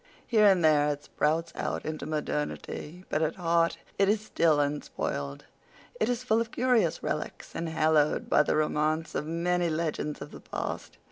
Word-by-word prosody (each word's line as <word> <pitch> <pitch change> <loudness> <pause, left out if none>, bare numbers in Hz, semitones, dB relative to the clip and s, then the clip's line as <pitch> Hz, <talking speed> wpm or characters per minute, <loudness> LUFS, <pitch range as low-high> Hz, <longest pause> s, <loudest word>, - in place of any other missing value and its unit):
Here 215 -3 +5
and 185 -4 +5
there 150 -1 +5
it 145 0 -3
sprouts 160 +3 0
out - - -3
into 155 0 -4
modernity, 150 +3 -4
but 155 - 0
at 160 - 0
heart 170 -2 +2 0.2
it 195 0 +4
is 215 +1 +3
still 165 -7 +2
unspoiled; 140 - -2 0.5
it 220 - +2
is 245 0 -1
full 230 -2 +2
of 230 - -3
curious 235 -9 +1
relics, - - -4
and 165 0 -3
haloed 155 -2 +2
by - - +5
the - - +1
romance 155 +1 0
of 150 - -2
many 175 +1 +1
legends 155 -2 -2
of - - -8
the - - -10
past. - - -5
160 Hz, 175 wpm, -28 LUFS, 150-180 Hz, 0.5 s, Here